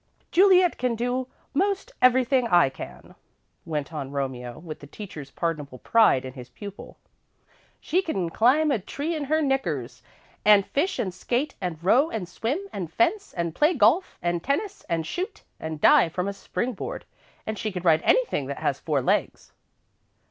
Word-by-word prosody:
"Juliet 370 -1 +5
can 250 -2 0
do 245 +2 -1 0.3
most 395 - 0
everything 255 0 +4
I 175 -9 +5
can," 135 - -10 0.5
went 150 0 -3
on 140 -3 -4
Romeo, 130 -3 -4
with 155 -1 -8
the 145 - -12
teacher's 150 -4 -9
pardonable 150 -5 -3
pride 220 - +3
in 130 - -7
his 125 -2 -10
pupil. 200 -1 -10 0.8
"She 360 +4 +1
can 190 - -2
climb 280 - +3
a 235 - +1
tree 285 - -4
in 300 -2 -3
her 310 +3 +1
knickers, 155 - -1 0.4
and 205 -2 +6
fish 365 +7 -1
and 185 -5 -2
skate 250 +10 -1
and 180 -4 -3
row 255 - +4
and 215 - -4
swim 230 - -2
and 175 -5 -5
fence, 405 - +1
and 170 -1 -1
play 300 - +3
golf 265 - +3
and 175 0 -1
tennis, 400 +9 -2
and 165 -1 0
shoot, 380 - -4 0.2
and 160 -1 -5
dive 165 - +5
from 180 +1 -1
a 200 - -2
spring 245 +5 -3
board, 195 - -6 0.4
and 220 -1 -4
she 215 - -2
can 180 -2 -5
ride 160 -3 +4
anything - - +2
that - - -4
has - - -1
four - - -1
legs." - - -1
215 Hz, 170 wpm, -25 LUFS, -, 0.8 s, and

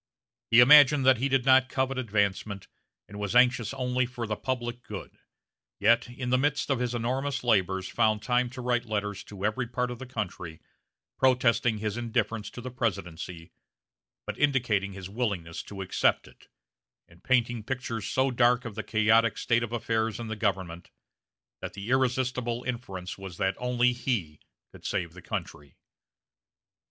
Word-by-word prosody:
He 115 +2 +7
imagined 145 +1 +7
that 130 -3 +5
he 135 +3 0
did 135 -2 +2
not 130 -1 +5
covet 130 0 -1
advancement, 100 -3 -1 0.4
and 105 0 -9
was 105 +2 -3
anxious 125 -2 +4
only 125 -1 -1
for 120 -2 -5
the 105 -1 -2
public 120 -1 -3
good; - - -8 0.6
yet, 115 +3 +3
in 125 0 -5
the 130 - +4
midst 145 +1 0
of 135 - +1
his 125 -1 -1
enormous 130 +4 -2
labors 95 -5 +1
found 110 -1 +1
time 125 0 +1
to 125 +1 -8
write 120 -1 0
letters 105 -3 -3
to 100 -1 -6
every 115 +3 -1
part 125 +1 -2
of 120 - -7
the 130 - -8
country, 90 -9 -5 0.6
protesting 125 -3 +3
his 105 +1 -3
indifference 115 -2 -2
to 120 - -9
the 130 +1 -6
presidency, 90 -7 -4 0.7
but - - -6
indicating 115 -9 +1
his 95 -1 -7
willingness 95 -7 -3
to 95 -1 -7
accept 90 - +1
it, 65 0 -19 0.6
and 85 0 -21
painting 120 -2 +1
pictures 115 -2 -4
so 130 +1 +1
dark 120 0 +3
of 115 - -5
the 110 - -4
chaotic 110 +1 +3
state 120 0 +1
of 115 -1 -4
affairs 115 -2 -1
in 120 - -5
the 110 - -3
government, 95 -5 -2 0.7
that - - -6
the 100 +4 -6
irresistible 125 -2 0
inference 100 -8 -5
was 95 -3 -8
that 95 0 +1
only 125 0 +2
he 105 - -2 0.3
could - - -15
save 90 -5 -2
the 90 - -12
country. 70 -3 -6
115 Hz, 165 wpm, -28 LUFS, 100-125 Hz, 0.7 s, He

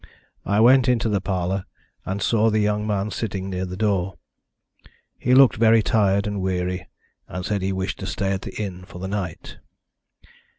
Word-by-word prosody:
I 100 +1 +2
went 130 +2 +6
into 115 -2 +2
the 100 -2 0
parlour, 95 0 -2 0.4
and 95 +1 -2
saw 115 -1 +3
the 110 - +1
young 105 0 0
man 105 0 -1
sitting 95 -2 -4
near 95 0 -3
the 90 +1 -6
door. 95 -4 0 1.0
He 125 +1 +3
looked 135 -2 +6
very 115 0 +5
tired 100 -2 +2
and 105 -2 -3
weary, 90 -1 -2 0.4
and 90 -1 -5
said 105 -3 -1
he 95 +1 -1
wished 95 0 -3
to 95 - -5
stay 95 +1 -1
at 95 -1 -2
the - - -7
inn 95 -4 -5
for 90 - -12
the 95 +1 -5
night." 95 -4 -5
100 Hz, 180 wpm, -23 LUFS, 95-110 Hz, 1.0 s, went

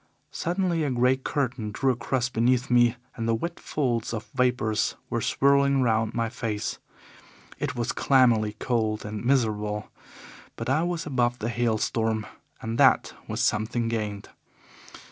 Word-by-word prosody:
Suddenly 175 -1 -1
a 145 - 0
grey 125 +1 +3
curtain 130 -5 -2
drew 130 +6 +1
across 120 +1 -1
beneath 125 +1 +1
me 120 -1 +5 0.2
and 115 -1 -3
the 115 - +2
wet 170 +9 -4
folds 120 -6 -1
of 110 0 -5
vapours 125 -4 +1 0.2
were - - 0
swirling 140 -1 +3
round 110 -2 +1
my 115 -1 0
face. 110 -3 -3 0.8
It - - -2
was 120 0 -1
clammily 115 -6 +3
cold 110 -4 -1
and 105 0 -5
miserable. 105 -5 0 0.6
But - - -5
I 155 +4 +3
was 170 -1 -2
above 125 -4 0
the 115 0 -3
hail 120 -1 +1
storm, 110 0 -1 0.4
and 115 +1 -3
that - - +4
was - - -2
something 115 +2 0
gained. 105 -3 -3
120 Hz, 145 wpm, -26 LUFS, 110-130 Hz, 0.8 s, me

